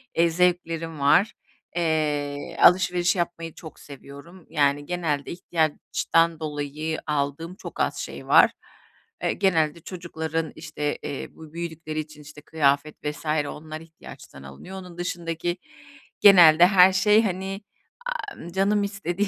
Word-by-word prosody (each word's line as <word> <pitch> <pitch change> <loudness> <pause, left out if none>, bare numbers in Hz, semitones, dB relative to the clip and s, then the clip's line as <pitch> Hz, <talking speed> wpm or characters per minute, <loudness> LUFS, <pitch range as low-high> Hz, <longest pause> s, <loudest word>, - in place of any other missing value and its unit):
eee, 170 +1 +4
zevklerim 165 -2 0
var. 175 +10 +4 0.4
Eee, 150 -4 -1
alışveriş 180 0 +4
yapmayı 165 -2 -3
çok 160 -3 -12
seviyorum. 140 +5 -13
Yani, 145 0 +1
genelde 160 -5 -2
ihtiyaçtan 165 0 0
dolayı 155 +1 -4
aldığım 150 +4 -2
çok - - -10
az - - 0
şey - - -7
var. - - +6 0.7
Eee, - - +1
genelde 165 -5 +1
çocukların 165 -3 -4
işte, 150 -2 -4
eee, 140 - -5
bu 160 -1 -13
büyüdükleri 160 -2 -5
için 155 -1 -8
işte 150 0 -13
kıyafet 145 -1 +1
vs. 150 +2 -5 0.2
Onlar 155 +1 -8
ihtiyaçtan 160 - -13
alınıyor. 70 - -10
Onun 180 -2 -12
dışındaki 175 0 -3 0.6
genelde 175 -4 +8
her 190 -1 +6
şey, 210 +4 +4
hani, 195 0 -3 0.6
aaa, 405 - -8
canım 200 +2 +2
istediği 200 -1 -2
165 Hz, 125 wpm, -24 LUFS, 150-180 Hz, 0.7 s, genelde